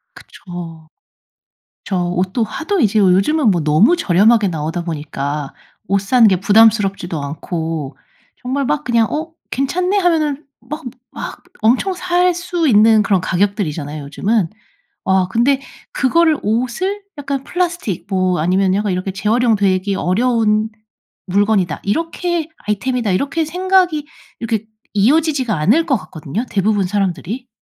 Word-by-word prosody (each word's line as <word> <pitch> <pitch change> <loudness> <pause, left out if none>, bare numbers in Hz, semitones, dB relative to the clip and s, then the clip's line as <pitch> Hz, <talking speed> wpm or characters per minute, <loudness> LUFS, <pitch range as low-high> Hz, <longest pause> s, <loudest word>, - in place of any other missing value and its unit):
그쵸. 165 -3 -10 1.0
저 195 - -2
옷도 180 +5 -1
하도 330 - -2
이제 215 -2 +2
요즘은 205 +8 +3
뭐 175 -4 +1
너무 155 - +4
저렴하게 210 - +3
나오다 160 +1 -3
보니까 145 -3 -4 0.3
옷 195 +2 +1
사는 230 +4 +4
게 190 -4 +3
부담스럽지도 200 -6 +3
않고 155 -1 -4 0.5
정말 265 +3 -1
막 295 +3 0
그냥 235 -2 +2
'어 315 +2 -3 0.2
괜찮네.' 360 +9 0
하면은 310 -5 +1 0.2
막 300 +2 -7 0.3
막 - - -7 0.2
엄청 255 - +2
살 360 0 +1
수 345 -2 -1
있는 220 -1 +5
그런 195 -2 +2
가격들이잖아요 175 -6 -1
요즘은. 190 +5 0 0.5
아 190 -1 +2
근데 265 +6 +2 0.3
그거를 315 +3 +2
옷을 250 - -1 0.2
약간 275 -1 -3
플라스틱 340 - -2
뭐 185 -2 +1
아니면 185 +4 +2
약간 205 -1 0
이렇게 185 +2 -2
'재활용 220 +4 +1
되기 195 0 +1
어려운 215 +2 +1 0.6
물건이다.' 195 -4 +1
이렇게 330 - -1 0.2
'아이템이다.' 225 +1 -1
이렇게 285 - 0
생각이 360 -2 +1 0.3
이렇게 220 -2 -2 0.3
이어지지가 265 +1 +2
않을 215 - +3
것 270 - +2
같거든요 185 - -5
대부분 205 0 +1
사람들이. 200 +5 -2
215 Hz, 305 characters per minute, -17 LUFS, 185-280 Hz, 1.0 s, 있는